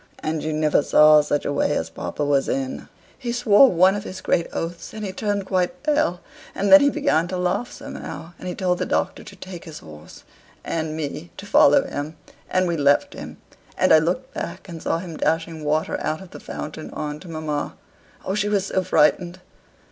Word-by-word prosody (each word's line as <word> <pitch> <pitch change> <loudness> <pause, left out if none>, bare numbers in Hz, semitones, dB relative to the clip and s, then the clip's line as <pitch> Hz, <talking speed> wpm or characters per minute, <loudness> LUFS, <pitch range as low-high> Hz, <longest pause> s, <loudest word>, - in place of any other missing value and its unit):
And 155 0 -1
you 155 - -2
never 155 -1 +2
saw 150 +1 +6
such 145 0 -1
a 145 - -1
way - - +1
as - - -4
papa 150 - -4
was 140 -1 +1
in: 135 -1 -3 0.3
he 245 -3 -3
swore 240 +1 +6
one 185 +2 +5
of 205 0 -4
his 185 - -7
great 170 - 0
oaths: 170 +4 -5
and 215 -1 -5
he 190 - -3
turned 205 -1 -2
quite 190 +8 -1
pale; 295 - +1 0.3
and 200 +1 0
then 290 - +10
he 285 - +5
began 285 - +1
to 185 +1 -4
laugh 180 +7 -1
somehow, 170 - -8
and - - -7
he 180 - -4
told 180 -2 0
the - - -1
Doctor 190 - -1
to 200 - -12
take 185 -2 -9
his 160 -2 -9
horse, 75 0 -13 0.4
and 160 -1 -3
me 155 +2 -5
to - - -8
follow 145 -7 +5
him; 145 +3 -5 0.3
and 185 0 +1
we 170 -1 -1
left 145 -1 +3
him. - - -9 0.4
And - - +4
I 155 - +8
looked 180 +12 -2
back, - - -6
and 165 -3 -8
saw - - 0
him 170 -2 -7
dashing 165 -1 -1
water 155 +1 0
out 155 0 -2
of 190 -2 -13
the - - -10
fountain 155 +1 -7
on 150 0 -5
to 185 - -13
mamma. 155 -3 -4 0.5
Oh, 190 - -1
she 205 0 0
was 200 -2 +1
so 190 -1 0
frightened!" 180 +1 +2
170 Hz, 210 wpm, -23 LUFS, 155-195 Hz, 0.5 s, then